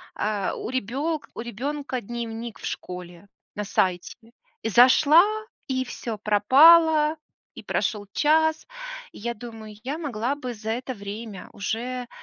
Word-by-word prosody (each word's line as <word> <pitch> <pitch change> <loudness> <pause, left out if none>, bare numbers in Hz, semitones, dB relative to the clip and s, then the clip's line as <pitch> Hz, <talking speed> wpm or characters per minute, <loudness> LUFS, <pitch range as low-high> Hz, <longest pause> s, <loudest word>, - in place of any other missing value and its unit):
а, 205 -2 -1
у - - -5
ребенка 270 +6 -2
у - - -4
ребенка 255 +3 -4
дневник 235 0 -6
в - - -8
школе 180 +1 -7 0.3
на 210 - -2
сайте". 185 -3 0 0.5
И - - 0
зашла, 280 - +7 0.4
и 260 -2 -1
всё 230 -3 -5
пропало, 300 +9 +6 0.4
и - - -9
прошел 210 -3 -1
час, 315 +1 +2 0.5
и - - -11
я 235 +2 -3
думаю: 225 -2 -10
"Я 275 +4 -3
могла 265 -4 -2
бы 255 -4 -5
за 220 0 -5
это 250 +3 -3
время 205 -1 -8
уже, 245 +4 -3
240 Hz, 135 wpm, -25 LUFS, 210-280 Hz, 0.5 s, зашла